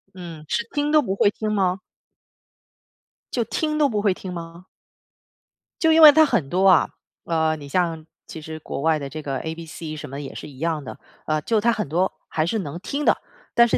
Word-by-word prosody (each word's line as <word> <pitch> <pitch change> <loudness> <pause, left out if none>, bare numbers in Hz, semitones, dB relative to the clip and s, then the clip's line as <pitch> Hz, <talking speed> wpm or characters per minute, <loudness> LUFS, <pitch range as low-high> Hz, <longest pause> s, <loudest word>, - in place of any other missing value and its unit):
嗯， 170 -4 -9
是 235 +8 -1
听 295 0 0
都 305 -1 +6
不 195 -6 -2
会 200 - +4
听 215 0 -3
吗？ 190 -2 +1 1.5
就 240 - +1
听 305 -1 -1
都 295 -2 +4
不 210 -5 -1
会 200 -3 +3
听 185 -1 -7
吗？ 170 +1 -8 1.2
就 320 -2 +4
因 325 - +6
为 300 -1 +12
它 315 +2 +6
很 145 - 0
多 190 +2 +3
啊， 185 - +5 0.3
呃， 160 -1 +1
你 145 -2 -10
像 165 -2 0 0.2
其 160 - -8
实 160 +1 -7
国 140 - -5
外 160 -1 +2
的 140 - -5
这 155 +1 -6
个 135 -2 -3
ABC 160 -1 -6
什 150 - -7
么 140 - -7
的 - - -5
也 135 - -8
是 - - -7
一 135 - -14
样 160 -3 -1
的， 130 - -9 0.3
呃， 155 -1 0
就 220 +3 +1
他 235 +1 +3
很 215 - -2
多 175 +5 +1 0.2
还 155 0 0
是 220 +5 -1
能 155 -2 -5
听 290 +5 -3
的， - - +4 0.4
但 235 - +7
是 235 - +1
175 Hz, 240 characters per minute, -23 LUFS, 155-220 Hz, 1.5 s, 为